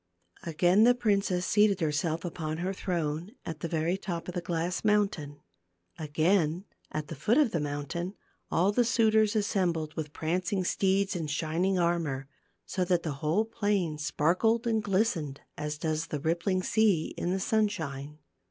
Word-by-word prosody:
Again 175 +5 +3
the 245 +1 +6
princess 200 -6 +1
seated 205 -2 +3
her 160 -3 +1
self 160 +3 -1
upon 160 -2 -4
her 185 +3 -2
throne 170 0 -3
at 160 -2 -5
the 170 - -3
very 165 +3 0
top 175 -3 -5
of 180 - -5
the 175 - -2
glass 175 +1 -2
mountain. 195 -9 0 0.6
Again 160 +3 +1 0.3
at 155 -1 -3
the 165 - -6
foot 220 - +2
of 290 -7 +4
the 165 - 0
mountain 145 +6 -3 0.3
all 185 +4 +3
the 245 +4 +3
suitors 220 -2 +3
assembled 180 -7 0
with 150 -2 -5
prancing 180 +5 -1
steeds 195 +2 +1
and 160 -3 -3
shining 165 +5 0
armor, 165 -6 0 0.4
so 185 - -1
that 175 -1 +1
the 160 - -2
whole 165 +9 +2
plain 205 -8 -1
sparkled 185 +11 +1
and 225 -2 +1
glistened, 190 -9 0
as 150 0 -4
does 160 +1 -2
the 150 - -3
rippling 170 +5 0
sea 205 -8 +2
in 175 - -2
the 190 +2 0
sunshine. 160 -10 -1
175 Hz, 160 wpm, -29 LUFS, 155-200 Hz, 0.6 s, the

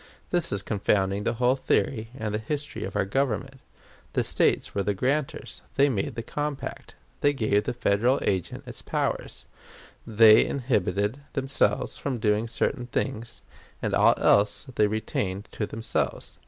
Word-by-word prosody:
This 175 -2 +1
is 100 -1 -1
confounding 100 -1 0
the 115 - 0
whole 125 +2 +3
theory 115 -3 0
and 110 -1 -3
the 105 - 0
history 145 +6 -4
of 95 - -6
our 100 -1 +2
Government. 135 +4 -1 0.5
The - - +2
States - - +1
were 100 - 0
the 100 +1 0
grantors; 135 +7 -2
they 140 +1 +4
made 105 -7 -2
the 115 - -4
compact; 145 +2 -5 0.2
they 145 0 +3
gave 110 -5 +1
the - - -1
Federal 120 +5 +2
agent 95 -3 -1
its - - -9
powers; - - -2 0.6
they 110 0 +7
inhibited 115 -3 0
themselves 135 0 0
from 135 -3 -2
doing 110 0 +1
certain 120 +1 -1
things, 115 -1 -3 0.4
and - - -2
all - - +5
else 100 +6 +3
they 105 -2 +3
retained 105 -2 -2
to 105 - -3
themselves. 115 +1 -3
110 Hz, 155 wpm, -26 LUFS, 105-135 Hz, 0.6 s, they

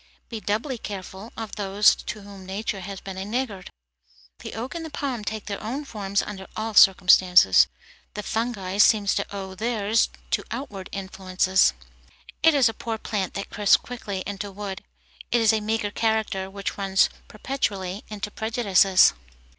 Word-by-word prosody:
Be 230 - -5
doubly 225 +5 -2
careful 195 +1 -7
of 225 -2 -6
those 205 +1 +4
to 215 - -7
whom 200 -1 -11
nature 195 +2 -4
has 195 +1 -7
been 190 -1 -7
a - - -3
niggard. 210 -3 -3 0.7
The - - -8
oak 235 +4 -5
and 335 -1 -5
the 320 - -6
palm 270 -6 -3
take 215 0 -4
their 200 -1 -5
own 260 +7 -4
forms 200 -5 -1
under 190 -2 -7
all 220 0 -3
circumstances; 180 - +6 0.5
the 210 - -4
fungi 205 -5 -2
seem 210 -1 +5
to 195 - +1
owe 195 -1 -6
theirs 220 +1 +1 0.2
to - - +1
outward 210 -9 -6
influences. 190 - +1 0.7
It 325 -1 +5
is 270 -4 +5
a 225 - -1
poor 225 0 -4
plant 205 -4 -3
that 195 - -5
crisps 205 -1 +5
quickly 205 -6 -6
into 205 0 -5
wood. 195 0 -6 0.5
It 240 - +3
is 225 -1 +4
a 220 - +1
meagre 215 -1 -1
character 220 -4 -1
which 200 +1 -5
runs 195 0 +3 0.2
perpetually 205 -5 -3
into 210 -1 -5
prejudices. 200 -5 +4
205 Hz, 160 wpm, -25 LUFS, 195-225 Hz, 0.7 s, circumstances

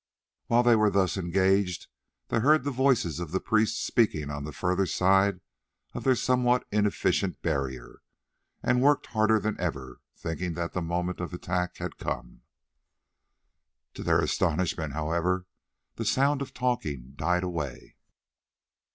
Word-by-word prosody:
While 120 +1 +4
they 120 -1 +5
were 110 -1 +4
thus 95 -2 +1
engaged 95 0 +1 0.4
they 115 - +1
heard 145 +4 +4
the 145 - -1
voices 125 - +1
of 85 +1 -2
priests 110 0 +2
speaking 75 -11 +1
on 70 0 -5
the 75 - -6
further 90 +4 0
side 95 0 +3 0.5
of - - -5
their 130 -1 +4
somewhat 125 0 +2
inefficient 100 -3 0
barrier, 70 -6 -3 0.6
and 125 0 +2
worked 145 +2 +3
harder 110 0 +3
than 110 0 -3
ever, 70 -7 -4 0.2
thinking 85 +1 -4
that 85 0 -3
the 90 - -1
moment 90 +2 -2
of 90 0 -4
attack 90 0 -2
had - - -6
come. - - -5 1.5
To - - -8
their - - +2
astonishment, 80 -5 0
however, 85 +4 -1 0.5
the - - -3
sound 140 +1 +2
of 140 - -5
talking 75 - -2
died 90 +5 0
away. 80 -8 -5
90 Hz, 140 wpm, -28 LUFS, 85-110 Hz, 1.5 s, they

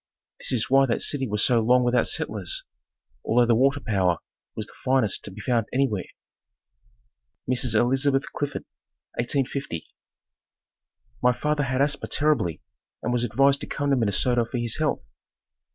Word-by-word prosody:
This - - -4
is 120 -4 +1
why 135 +1 +4
that 115 - 0
city 135 -3 0
was 105 -1 +2
so 120 -2 +3
long 125 +3 +4
without 120 0 +2
settlers, - - -1 0.6
although 120 +2 +3
the 120 - +3
water 135 +5 +3
power 95 - +1 0.4
was 110 - -4
the - - -18
finest 130 -6 0
to - - -6
be 100 - -11
found 115 -2 0
anywhere. 125 -8 0 1.4
Mrs. 125 -2 0
Elizabeth 135 +4 +2
Clifford 145 -1 -3 0.6
1850. 130 - -2 1.4
My 125 0 +4
father 150 +2 0
had 130 +1 +1
asthma 145 +1 -1
terribly 145 - 0 0.4
and 120 - -1
was 120 -1 +1
advised 135 +4 +3
to - - -5
come 145 -1 -1
to - - +5
Minnesota 120 +1 +1
for 120 +2 -5
his 120 -2 -1
health. 155 -2 0
125 Hz, 150 wpm, -25 LUFS, 115-135 Hz, 1.4 s, to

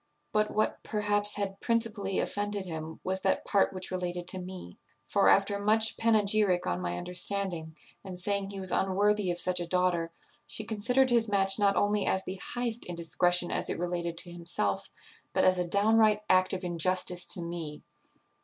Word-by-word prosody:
But 215 0 +1
what, 215 - -1
perhaps, 205 -1 0
had 200 -1 -4
principally 225 -4 -1
offended 205 -1 -2
him 160 -2 -6
was 190 +1 -2
that 190 - 0
part 200 - +2
which 185 0 -5
related 180 -1 -3
to 185 - -2
me; 180 - -9 0.3
for, - - +3
after 200 +1 +3
much 220 +2 +2
panegyric 210 -4 +2
on 90 0 -2
my 90 0 -3
understanding, 180 - -2 0.3
and 185 -2 -8
saying 200 +1 -2
he 200 -1 -7
was 185 -1 +1
unworthy 200 +1 +1
of 175 0 -2
such 180 0 +1
a 175 - -4
daughter, 180 -2 +1 0.4
she 220 - -2
considered 245 +5 +1
his 235 -1 +3
match 195 -1 +2
not 200 -1 +3
only 205 +2 +1
as 190 - +1
the 190 +1 -6
highest 240 -1 -3
indiscretion 175 +1 +1
as - - -1
it - - -2
related 170 -1 -3
to 175 +1 -1
himself, 170 - -2 0.4
but - - +2
as 185 -1 +4
a 180 - -1
downright 210 +2 +3
act 185 0 +4
of 190 0 -3
injustice 180 +1 +1
to 175 - 0
me. 170 -3 -6
190 Hz, 175 wpm, -29 LUFS, 175-205 Hz, 0.4 s, as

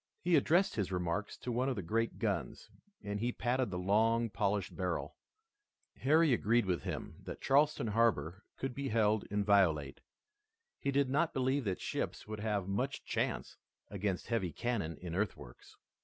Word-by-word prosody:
He 175 -1 +2
addressed 170 +6 +3
his 100 -3 -1
remarks 90 +3 -2
to 125 - -5
one 125 +3 +1
of 130 - -1
the 100 - -4
great 115 +6 -1
guns, 95 - -3 0.3
and 105 0 -3
he 120 +3 0
patted 125 0 0
the 90 - -3
long, 110 +5 +2
polished 100 -1 -1
barrel. 90 -2 -2 0.8
Harry 155 +1 +4
agreed 115 0 +3
with 90 -2 0
him - - -5
that - - -6
Charleston 145 -1 +3
harbor 105 -5 +1
could 135 -1 -3
be 140 +2 -3
held 110 -1 +2
inviolate. 95 -9 +2 0.8
He 140 - -2
did 140 0 +2
not 160 +4 +1
believe 130 0 +1
that 95 -3 -1
ships - - -3
would 110 0 -5
have 105 -3 -1
much 125 +8 -2
chance - - -2 0.3
against 100 -2 -2
heavy 100 -7 0
cannon 100 -5 -2
in 90 -2 -6
earthworks. 90 - -4
105 Hz, 160 wpm, -34 LUFS, 95-125 Hz, 0.8 s, Harry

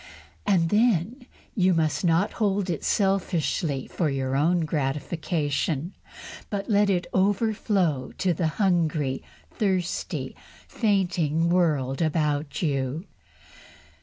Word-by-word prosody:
And 175 -5 +3
then 230 - +1 0.3
you 185 -4 +3
must 160 +1 0
not 170 +3 +2
hold 195 -3 +1
it 165 - -4
selfishly 175 -7 0
for 165 -4 -1
your 135 -1 -1
own 170 +5 +2
gratification, 150 +2 -2 0.6
but 200 -1 -3
let 205 -2 +3
it 180 -2 +1
overflow 195 - +1
to 185 -2 +1
the 165 0 0
hungry, 160 -8 +1 0.3
thirsty, 190 -5 -2 0.3
fainting 175 -7 +1
world 155 -6 +1
about 150 -1 0
you. 140 +2 -1
170 Hz, 105 wpm, -25 LUFS, 150-195 Hz, 0.6 s, And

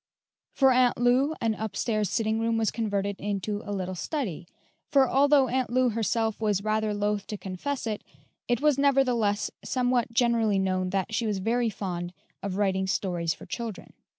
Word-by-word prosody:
For 270 -1 +5
Aunt 250 -1 +3
Lou 255 +5 +3
an 225 -1 +1
up 215 -2 -5
stairs 215 -4 0
sitting 220 +1 0
room 230 0 +1
was 220 -2 +1
converted 200 -3 -2
into 205 +1 -2
a 205 - -6
little 185 -2 -3
study; 185 - -4 0.4
for 270 -2 +4
although 280 +1 +4
Aunt 255 +1 0
Lou 255 +1 +3
herself 225 0 -1
was 205 -3 +1
rather 215 0 0
loath 205 0 -1
to 210 - -4
confess 200 +10 -4
it, 215 -2 -3 0.4
it 240 0 +1
was 295 -2 +3
nevertheless 250 -7 +2
somewhat 245 -2 0
generally 230 -3 +2
known 185 -1 0
that 195 +3 -2
she 225 0 0
was 210 -2 0
very 230 +4 +1
fond 180 -3 -4 0.3
of 195 -1 -3
writing 190 -2 +1
stories 175 -4 -1
for - - -12
children. 230 -4 -6
220 Hz, 175 wpm, -27 LUFS, 200-245 Hz, 0.4 s, For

